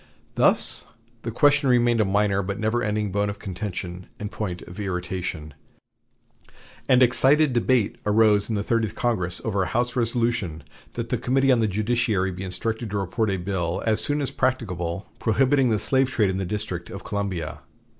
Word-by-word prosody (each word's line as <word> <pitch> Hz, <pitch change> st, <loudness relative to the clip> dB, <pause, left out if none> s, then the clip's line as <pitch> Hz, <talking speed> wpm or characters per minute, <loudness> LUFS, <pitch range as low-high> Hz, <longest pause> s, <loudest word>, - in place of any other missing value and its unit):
Thus -, -, +2 dB, 0.4 s
the 115 Hz, -, -4 dB
question 140 Hz, +3 st, +3 dB
remained 120 Hz, -2 st, +4 dB
a -, -, +3 dB
minor 100 Hz, 0 st, +2 dB
but 100 Hz, +2 st, -4 dB
never 110 Hz, +2 st, 0 dB
ending 105 Hz, -2 st, -1 dB
bone 100 Hz, +1 st, 0 dB
of 100 Hz, -, -5 dB
contention 90 Hz, -2 st, -6 dB
and 105 Hz, 0 st, -5 dB
point 90 Hz, -5 st, -4 dB
of 90 Hz, +4 st, -11 dB
irritation, 90 Hz, -5 st, -4 dB, 1.4 s
and 130 Hz, 0 st, +6 dB
excited 135 Hz, +3 st, +4 dB
debate 120 Hz, -2 st, +1 dB
arose 105 Hz, -1 st, +3 dB
in 110 Hz, -, 0 dB
the 100 Hz, -, -1 dB
Thirtieth 115 Hz, -2 st, 0 dB
Congress 90 Hz, -8 st, 0 dB
over 100 Hz, -3 st, 0 dB
a 90 Hz, -, 0 dB
House 120 Hz, +6 st, -1 dB
resolution 115 Hz, -, 0 dB, 0.3 s
that -, -, -4 dB
the -, -, 0 dB
Committee 135 Hz, +1 st, +2 dB
on 125 Hz, -, +4 dB
the 110 Hz, -, +2 dB
Judiciary 105 Hz, -2 st, 0 dB
be 90 Hz, +1 st, -7 dB
instructed 110 Hz, +4 st, -3 dB
to 100 Hz, -, -2 dB
report 100 Hz, +3 st, -1 dB
a 95 Hz, -, 0 dB
bill 90 Hz, -1 st, -2 dB
as 110 Hz, -1 st, +2 dB
soon 145 Hz, +3 st, 0 dB
as 140 Hz, -, -1 dB
practicable 95 Hz, -8 st, -2 dB
prohibiting 130 Hz, +3 st, +3 dB
the 110 Hz, -, +2 dB
slave 130 Hz, +4 st, +1 dB
trade 105 Hz, -7 st, +2 dB
in 95 Hz, -, -3 dB
the 95 Hz, -, -2 dB
District 90 Hz, -3 st, -4 dB
of 100 Hz, -, -8 dB
Columbia. 95 Hz, -6 st, -3 dB
105 Hz, 175 wpm, -24 LUFS, 95-120 Hz, 1.4 s, and